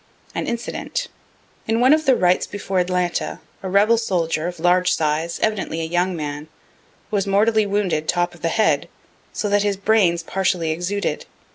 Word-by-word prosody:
An - - -3
Incident. 475 - -3 0.6
In 225 +1 +1
one 255 +4 +6
of 310 -1 +1
the 265 - +6
rights 180 -3 +2
before 195 -2 -2
Atlanta, 180 -1 -1 0.2
a 190 - -4
rebel 210 +4 +4
soldier, 170 -6 -1
of 175 -2 -6
large 180 +2 +3
size, 160 +2 -1
evidently 210 -6 -1
a - - -2
young 175 +3 0
man, 150 -1 -5 0.6
was 200 -2 0
mortally 215 +2 +3
wounded 190 -6 0
top 175 0 0
of 175 - -16
the - - 0
head, 220 +4 +1 0.4
so 210 - -2
that 205 0 +2
the 205 -1 0
brains 195 -5 +2
partially 180 -2 0
exuded. 180 +5 -2
185 Hz, 165 wpm, -21 LUFS, 170-210 Hz, 0.6 s, one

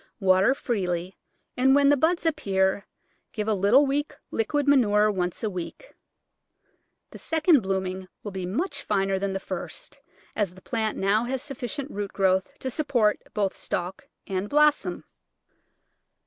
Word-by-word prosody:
Water 190 +5 +4
freely, 180 -7 -2 0.4
and 265 +2 +4
when 280 0 +5
the 290 - +6
buds 330 +5 +1
appear 195 -10 +1 0.5
give 210 -2 -3
a 220 - +2
little 210 +9 +4
weak 290 +2 -1 0.2
liquid 285 +6 0
manure 215 -6 +4
once 180 -1 -3
a - - +1
week. 190 - -7 1.2
The - - -10
second 320 -3 +3
blooming 190 -1 -3 0.2
will 205 - -5
be 185 -2 -4
much 300 - -2
finer 195 -2 0
than 195 0 -2
the 195 - -2
first, - - -7 0.3
as 200 -5 -1
the 185 - -15
plant 220 -3 -2
has - - -5
now 220 +6 +1
sufficient 275 +1 -5
root 205 -1 -4
growth 190 -1 +1
to 260 - -4
support 240 -7 +1
both 200 -2 0
stalk 190 +10 -4 0.2
and 195 +1 -3
blossom. 300 0 +2
210 Hz, 150 wpm, -26 LUFS, 190-275 Hz, 1.2 s, the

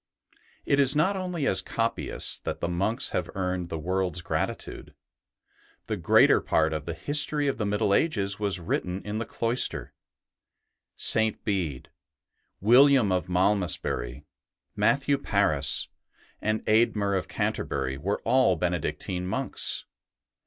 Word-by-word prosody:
It 140 - +2
is 140 0 +4
not 165 +7 +2
only 180 -5 -3
as - - +1
copyists 115 0 -2
that - - -5
the - - -2
monks 95 +6 -1
have - - -2
earned 90 -2 -2
the 80 - -4
world's 90 +1 -2
gratitude - - -4 0.9
The - - -2
greater - - +4
part 80 0 +1
of 75 -2 -4
the 85 - -4
history 145 - 0
of 135 - -1
the 105 - -2
Middle 105 0 +1
Ages 100 -9 +1
was 100 -3 0
written 90 +2 -3
in 105 +1 -3
the 115 - -4
cloister; 115 +2 0 1.0
St. 110 -1 +3
Bede, 85 - -2 0.7
William 125 0 +5
of 90 -1 -1
Malmesbury, 90 -8 0 0.5
Matthew 140 +3 +2
Paris, 75 - +1 0.5
and 110 0 -1
Eadmer 110 -3 +2
of 95 - -2
Canterbury 65 +1 -2
were 100 +7 -2
all 125 -5 +3
Benedictine 90 +1 -2
monks. 95 - -1
100 Hz, 130 wpm, -26 LUFS, 90-115 Hz, 1.0 s, William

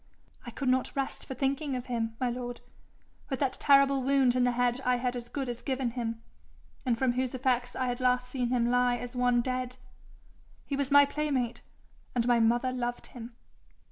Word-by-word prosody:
'I - - -5
could 275 - -2
not 255 0 +1
rest 275 -1 -3
for 265 - -5
thinking 275 +1 -1
of 250 0 -4
him, 230 -2 -2
my 255 - +1
lord, 245 0 -5 0.7
with 265 - -2
that 275 -3 +1
terrible 275 -1 +4
wound 265 -2 +3
in 250 -1 +3
the 245 - +2
head 245 +1 +1
I 250 0 +3
had 245 0 -1
as 240 -1 -6
good 275 0 -3
as 240 -1 -5
given 260 -3 -1
him, 230 -2 -4 0.6
and 235 -2 +2
from 260 0 +2
whose 255 +1 -1
effects 250 -1 0
I 255 - -1
had 245 0 -2
last 250 0 +2
seen 250 -1 -2
him 240 -1 +1
lie 245 0 +3
as 245 +1 -7
one 245 -1 +3
dead. 255 0 -3 0.9
He 280 - -2
was 275 -1 -1
my 285 0 +7
playmate, 280 -5 -2 0.5
and 240 -1 +1
my 240 -1 +4
mother 240 +3 +2
loved 245 -1 -3
him.' 235 -1 -9
250 Hz, 200 wpm, -29 LUFS, 245-265 Hz, 0.9 s, my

